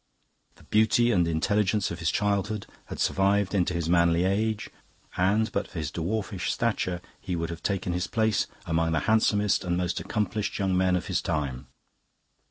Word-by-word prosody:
The - - -19
beauty 110 +2 +3
and 90 -6 +3
intelligence 100 +5 +1
of 85 - -5
his 80 -1 0
childhood 100 +1 0 0.2
had - - -8
survived 100 0 +2
into 90 -3 +1
his 85 -2 -1
manly 85 0 +3
age, 105 +3 0 0.5
and, 105 +4 +2
but 100 0 -2
for - - -10
his 75 -2 -3
dwarfish 95 +3 -2
stature, 95 -7 -1 0.2
he 90 - -4
would 85 0 -3
have 85 - -7
taken 95 -3 -1
his 90 0 -1
place 110 -2 +1 0.2
among 80 0 +1
the 80 - +1
handsomest 105 -2 +2
and 90 -1 -1
most 90 0 -1
accomplished 105 -1 -2
young 95 -2 0
men 90 0 +3
of 90 - -2
his 95 -3 -1
time. 70 -6 -3
95 Hz, 175 wpm, -27 LUFS, 85-105 Hz, 0.5 s, beauty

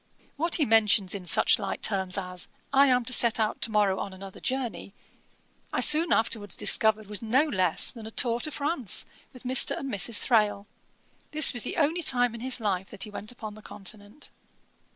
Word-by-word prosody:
What 330 +4 +1
he 305 - +2
mentions 215 -4 +2
in 190 -3 -7
such 170 - +3
light 195 -2 -6
terms 190 -3 -2
as, 180 -2 -7 0.3
'I 280 +1 +5
am 250 -2 +1
to 255 - -1
set 235 -1 +2
out 215 -1 -2
to - - +2
morrow 205 -3 0
on 195 - -6
another 190 0 -12
journey,' 250 -6 -5 0.8
I - - -2
soon 315 +3 +6
afterwards 215 -3 0
discovered 220 -1 +3
was 205 0 -5
no 240 +6 +1
less 185 - +1
than 225 -3 -11
a - - -8
tour 235 +1 0
to 305 - -5
France 285 - -3 0.3
with 255 - -16
Mr. 260 +1 +3
and 275 -3 -6
Mrs. 205 +3 0
Thrale. 210 -4 0 0.7
This 310 -2 +7
was 240 - -2
the - - -6
only 325 +2 0
time 245 -6 +2
in 230 - -10
his 255 0 +2
life 190 -4 -3
that - - -1
he 215 - -5
went 210 +2 -6
upon 220 -3 -9
the 215 - -14
Continent. 205 +5 -9
220 Hz, 195 wpm, -26 LUFS, 205-255 Hz, 0.8 s, This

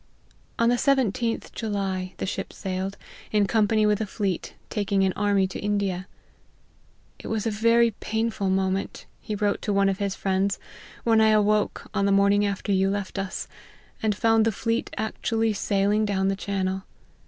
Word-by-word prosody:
On 230 0 +3
the 245 - +3
17th 240 -3 +1
July 195 -4 -3
the - - -3
ship 190 - -4
sailed, 190 0 -4 0.3
in 210 -1 +3
company 215 +1 +2
with 210 0 +2
a 215 - -2
fleet, 195 -3 -3 0.2
taking 200 -2 +1
an 190 -1 +2
army 205 -2 +2
to 185 - -5
India. 200 -3 -1 0.6
" - - -36
It - - -8
was 220 -1 -2
a 225 - +1
very 230 +2 +4
painful 220 -2 -2
moment," 190 0 -1
he 215 - -4
wrote 205 0 0
to 210 - -2
one 200 0 +3
of 195 - -2
his 200 -1 -1
friends, 195 +1 0 0.2
" - - -19
when 225 -1 +4
I 220 - +5
awoke, 210 0 +2
on 200 0 +1
the - - +2
morning 200 +1 +4
after 200 0 -3
you 195 0 +3
left 200 0 -3
us, 195 -1 -4 0.5
and 215 -2 +1
found 225 +1 +3
the 225 - +2
fleet 230 +3 -1
actually 225 0 0
sailing 205 +1 +1
down 195 -2 +1
the 195 - 0
chan 195 -1 -2
nel. 190 +1 -3
205 Hz, 180 wpm, -25 LUFS, 195-220 Hz, 0.6 s, I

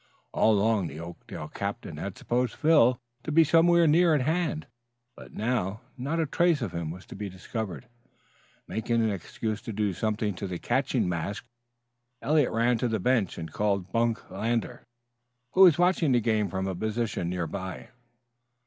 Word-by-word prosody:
All 110 - +4
along 105 -2 +2
the 75 +1 -8
Oakdale 85 -2 -8
captain 100 -5 -5
had 95 +4 -5
supposed 120 -1 -1
Phil 150 -6 +4 0.2
to 155 - -4
be 165 +2 +6
somewhere 170 +2 +5
near 165 +1 +5
at 145 - +1
hand, 160 +2 -1 0.5
but - - -12
now 110 -3 -2
not 140 +6 -2
a 160 - +2
trace 165 -2 +2
of 105 - -3
him 85 -2 -4
was 90 +3 -8
to - - -10
be 105 -1 -5
discovered. 95 +4 -6 0.8
Making 115 +1 0
an 110 - +1
excuse 105 +4 -4
to - - -6
do 105 -2 -1
something 105 +2 -1
to 100 +2 -5
the 90 -1 -4
catching - - 0
mask, 90 +5 -3 0.7
Eliot 150 -2 +2
ran 115 +1 +2
to 125 - +1
the 110 -2 -1
bench 115 -3 +1
and 80 -2 -7
called 100 -3 -1
Bunk 115 -1 0
Lander, 115 +4 -2 0.7
who 190 - +3
was 175 -6 +8
watching 175 -5 +3
the 120 - +4
game 110 -3 +1
from 95 +2 -2
a 95 - -2
position 110 -2 -2
near 90 -1 -2
by. 95 +3 -6
110 Hz, 175 wpm, -27 LUFS, 95-130 Hz, 0.8 s, was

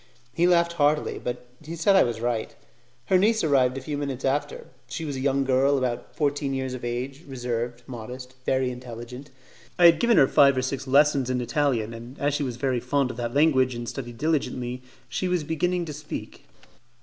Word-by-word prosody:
He 170 +2 +3
laughed 170 -1 +3
heartily, 150 -1 +1
but 125 0 -4 0.2
he 160 +2 -6
said 180 +4 +3
I 190 - +7
was 120 -2 0
right. 120 -2 -2 0.5
Her 185 +5 +3
niece 220 +3 +2
arrived 135 -4 +3
a - - -4
few 145 +2 -4
minutes 135 -3 -4
after; 145 +2 -1 0.2
she 160 +6 -5
was 145 -2 -4
a - - -4
young 135 0 +1
girl 135 +2 +3
about 125 -2 -3
fourteen 145 -2 0
years 130 -1 -3
of 130 - -7
age, 125 +4 -4
reserved, 120 -2 -4
modest, 125 +1 -8
and 130 0 -29
very 130 -1 +1
intelligent. 125 +2 -9 0.5
I 175 - +5
had 165 -2 +7
given 235 -1 +3
her 135 - +7
five 140 -1 +5
or 130 - +1
six 135 +1 -3
lessons 140 -1 +4
in 130 0 0
Italian, 120 -2 0
and 120 +3 -10
as 145 0 0
she 145 - -1
was 125 -4 -3
very 130 -1 0
fond 130 +1 0
of 115 - -11
that 120 0 -4
language 130 -4 +3
and 120 0 -5
studied 120 -3 -6
diligently 130 -4 -1 0.3
she 185 - -2
was 180 -3 0
beginning 175 +3 -1
to 155 - -6
speak. 150 +1 -8
135 Hz, 205 wpm, -25 LUFS, 125-150 Hz, 0.5 s, I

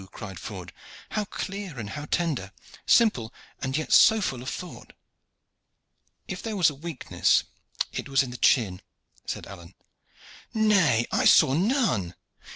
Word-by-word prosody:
cried 95 -4 -8
Ford. 90 -4 -8 0.4
"How 215 -1 -1
clear 195 -6 -6
and 105 -4 -6
how 145 +8 -6
tender 150 - -1 0.4
simple, 130 - +3 0.3
and 130 +1 -2
yet 155 - -2
so 220 0 +7
full 130 - -3
of 130 - -5
thought!" 180 - -8 1.3
"If - - -5
there 225 -2 -4
was 170 -5 +4
a - - -9
weakness 150 0 0 0.5
it - - -5
was 135 0 +3
in 125 - -7
the 125 - -7
chin," 100 -10 +2 0.5
said - - -4
Alleyne. 90 -2 -12 0.8
"Nay. 195 - +3
I - - +1
saw 130 - +6
none." 170 - +1
135 Hz, 145 wpm, -26 LUFS, -, 1.3 s, so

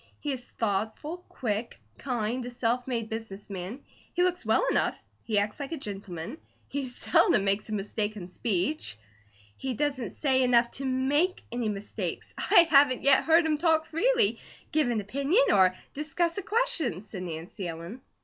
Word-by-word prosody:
He 295 - -2
is 250 -2 -5
thoughtful, 220 - -2
quick, 225 -2 -3 0.2
kind, 245 -1 -2
a 245 - -5
self 245 +1 -1
made 230 -4 -2
business 220 -3 -6
man. 195 +8 -5 0.3
He 355 - +3
looks 360 0 0
well - - +3
enough, - - +1 0.2
he 215 -3 -1
acts 205 +4 0
like 280 +2 -4
a - - -3
gentleman, 200 - -6 0.3
he 280 -2 -3
seldom 245 - +3
makes 200 +2 0
a - - -3
mistake 210 +1 -2
in 180 -4 -7
speech 190 - -1 0.3
" 100 0 -30
"He 260 -2 -1
doesn't 275 -2 -1
say 265 -3 +1
enough 240 -1 +4
to 275 - -5
MAKE 275 +8 +1
any 240 -2 -1
mistakes. 205 0 -4
I 340 - +5
haven't 275 -3 +5
yet 275 -1 +5
heard 330 +1 +5
him 305 -2 +1
talk 320 -1 +3
freely, 445 +8 +2 0.3
give 305 -5 +2
an 225 -3 0
opinion, 280 - +2
or 185 -1 +5 0.2
discuss 325 +3 -1
a - - -3
question," 385 - 0
said 205 -3 -7
Nancy 175 +3 -5
Ellen. 170 +9 -7
245 Hz, 170 wpm, -28 LUFS, 205-300 Hz, 0.3 s, I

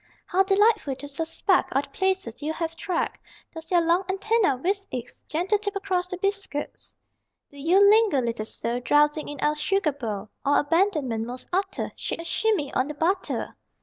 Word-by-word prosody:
How 370 - +2
delightful 400 - +3
to 285 +2 -8
suspect 325 +6 0
All 275 +2 +2
the - - -12
places 380 -12 -1
you 305 +2 -2
have 330 0 -3
trekked: 355 0 -2 0.3
Does 325 0 -9
your 350 -2 +4
long 340 +3 +2
antenna 390 - +2
whisk 390 +8 -2
its 250 -1 -6
Gentle 365 +6 +1
tip 405 -1 -3
across 375 -2 -1
the 365 - -5
biscuits? 395 -6 -3 0.5
Do 285 - -12
you 335 +7 +4
linger, 425 -8 +5
little 235 -3 -2
soul, 235 +2 -3
Drowsing 295 +4 +2
in 290 -2 -7
our 300 - +3
sugar 310 +2 +1
bowl? 220 -7 -5
Or, 285 +1 +3
abandonment 295 - +1
most 250 +1 -7
utter, 385 +1 -1
Shake - - -4
a - - -5
shimmy 365 -7 0
on 255 - +1
the 300 - -6
butter? 365 +6 -1
330 Hz, 180 wpm, -25 LUFS, 285-390 Hz, 0.5 s, linger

